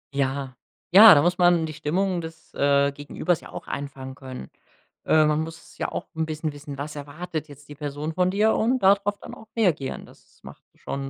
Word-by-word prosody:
Ja. 135 -1 -2 0.4
Ja, 205 0 +10
da 145 - +4
muss 180 +1 +1
man 175 -2 +4
die 155 - -6
Stimmung 180 +4 -1
des, 160 0 -11
äh, 140 0 +2
Gegenübers 145 +4 -2
ja - - -12
auch - - -8
einfangen 135 -2 -6
können. 130 - -9 0.6
Äh, 155 -1 +5
man 150 +1 +1
muss 165 +1 -10
ja - - -3
auch - - -4
'n 160 - 0
bisschen 155 0 -3
wissen, 145 -1 -9
was 150 +1 -6
erwartet 155 +2 -6
jetzt 145 0 -15
die 145 - -9
Person 150 +2 -5
von 185 0 +2
dir 215 +3 +2
und 250 +4 +1
da 195 -2 +6
drauf 205 0 -4
dann - - -9
auch 220 - -15
reagieren. 170 - 0
Das - - -22
macht - - -13
schon 135 0 -5
155 Hz, 205 wpm, -24 LUFS, 140-180 Hz, 0.6 s, Ja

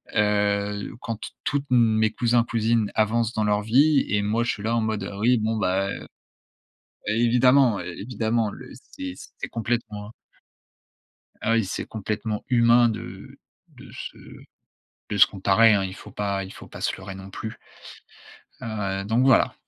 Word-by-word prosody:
heu, 105 -1 +1
quand 115 -1 -3
t - - -7
tous 145 -1 0
mes 110 -3 +4
cousins, 120 +1 +2
cousines 115 -2 0
avancent 110 +1 +1
dans 110 - 0
leur 105 0 +2
vie 140 +6 +4
et 105 +1 +1
moi 110 +3 0
je 120 - 0
suis 100 - -6
là 115 +2 0
en 115 - +1
mode, 110 -2 -2
heu, - - -6
oui, 120 +2 +4
bon 110 +1 -1
bah, 95 -1 +1
heu - - -6 1.0
Évidemment, 120 +1 +4
évidemment 110 +5 -2
le - - -11 0.3
c'est 90 -1 -5 0.2
c'est - - -4
complètement 110 -3 -3 1.3
ah 115 - +1
oui, 115 -1 +3
c'est 95 - -4
complètement 105 0 -4
humain 120 -1 +5
de 105 -4 -7 0.3
de - - -15
se - - -8 0.9
de 105 - -1
se - - +9
comparer, 105 +3 +4
hein, 100 - +2
il 95 -1 -4
faut - - -12
pas 100 -1 -2
il 95 - -9
faut - - -12
pas - - -11
se - - 0
leurrer 95 - -8
non 95 0 -10
plus. 110 +3 -7 1.0
Heu, 100 -3 -3
donc 115 +5 +2
voilà. 130 -3 +4
110 Hz, 165 wpm, -24 LUFS, 100-115 Hz, 1.3 s, se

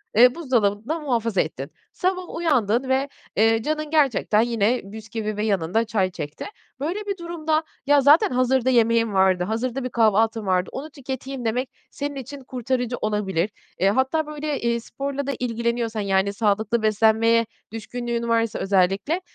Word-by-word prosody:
eee, 250 +2 +7
buzdolabında 245 -1 0
muhafaza 230 - 0
ettin. 140 -1 -5 0.2
Sabah 365 -1 -2
uyandın 260 -7 +1
ve, 265 +2 +1 0.3
eee, 225 +1 +3
canın 305 +1 -2
gerçekten 275 -8 +3
yine 230 +1 +1
bisküvi 215 +1 -5
ve 210 - -1
yanında 195 +1 +1
çay 200 -5 0
çekti. 150 -4 -6 0.3
Böyle 330 +9 -2
bir 400 -1 -3
durumda, 325 -2 -1 0.2
"Ya, 290 0 +5
zaten 290 +4 +6
hazırda 255 0 +2
yemeğim 230 -2 +3
vardı, 190 -2 +3
hazırda 235 +6 -2
bir 255 - -3
kahvaltım 225 -1 +2
vardı, 185 -1 +1
onu 285 +4 -6
tüketeyim." 265 -2 -6
demek 245 +4 -1 0.2
senin 285 0 -4
için 275 +1 -7
kurtarıcı 250 -1 -2
olabilir. 210 -3 0 0.3
Eee, 195 - +4
hatta, 265 +8 +1
böyle, 300 -1 -3
eee, 235 0 +1
sporla 275 +4 -5
da - - 0
ilgileniyorsan, 235 -2 -1
yani, 195 0 +1
sağlıklı 215 +2 +1
beslenmeye 220 +2 +3 0.3
düşkünlüğün 235 +1 -4
varsa 230 -1 +1
özellikle, 195 - +1
235 Hz, 150 wpm, -23 LUFS, 215-270 Hz, 0.3 s, eee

